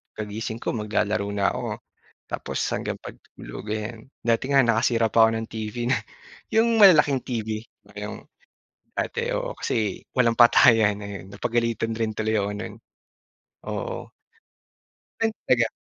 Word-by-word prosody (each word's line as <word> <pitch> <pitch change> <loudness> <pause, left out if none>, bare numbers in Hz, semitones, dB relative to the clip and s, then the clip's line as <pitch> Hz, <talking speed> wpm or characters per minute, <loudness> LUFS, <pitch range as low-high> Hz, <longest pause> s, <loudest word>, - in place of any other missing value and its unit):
pagkagising 110 +2 -5
ko - - 0
maglalaro 105 -2 -1
na 100 -1 +2
ako. - - -4 0.7
Tapos - - -3
hanggang - - -2
pagtulog - - -10
ayan. 110 +2 -4 0.2
Dati 115 +2 +1
nga 140 -1 +5
nakasira 115 -1 +2
pa 115 +1 +6
'ko 115 - 0
ng 110 0 -3
TV 115 +3 -3
nun. 130 - +2 0.5
Yung 230 +1 +4
malalaking 150 - +6
TV, 110 -2 -3 0.3
yung 105 +1 -6 0.7
dati. - - -2
Oo, - - -3
kasi 105 -4 -2
walang 120 -3 +2
patayan 110 -3 +6
ayon, 100 -2 -7
napagalitan 115 0 -1
rin 110 -1 -1
tuloy 110 0 0
ako 100 0 -1
nun. 105 - -6 0.9
Oo. - - -5 1.1
Ay 225 0 +2 0.2
talaga 120 -2 +4
115 Hz, 135 wpm, -25 LUFS, 105-120 Hz, 1.1 s, pa